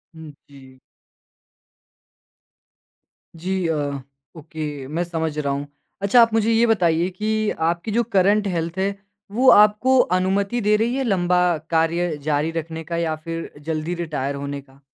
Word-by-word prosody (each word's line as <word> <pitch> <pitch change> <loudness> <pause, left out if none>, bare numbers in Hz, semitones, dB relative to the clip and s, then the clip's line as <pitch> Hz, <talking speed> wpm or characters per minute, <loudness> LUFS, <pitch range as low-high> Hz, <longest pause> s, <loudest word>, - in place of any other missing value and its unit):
हुँ, 160 -2 -10 0.2
जी। 130 -2 -16 2.6
जी 185 +1 -2
अ, 160 - 0 0.6
okay 150 -3 -6
मैं 165 +4 -2
समझ 160 -3 -3
रहा 140 -2 -1
हूँ। 140 +1 -4 0.3
अच्छा 200 +5 +5
आप 230 -1 +3
मुझे 225 0 +2
ये 230 +1 +4
बताइए 175 -5 +2
कि 215 +3 -1 0.2
आपकी 170 +6 -3
जो 235 +3 +2
करंट 205 -1 +2
हेल्थ 170 -1 -3
है 195 +1 0 0.4
वो 255 +5 +4
आपको 210 +5 +5 0.2
अनुमति 200 +5 0
दे 210 +1 +3
रही 230 +3 0
है 270 - -1
लंबा 180 -6 +1 0.3
कार्य 165 0 +1
जारी 150 +1 0
रखने 165 0 -5
का 170 +2 -4
या 165 -2 -1
फ़िर 165 +1 -6
जल्दी 160 +2 -3
रिटायर 150 -5 -3
होने 140 0 -5
का? 135 0 -23
170 Hz, 150 wpm, -22 LUFS, 155-205 Hz, 2.6 s, अच्छा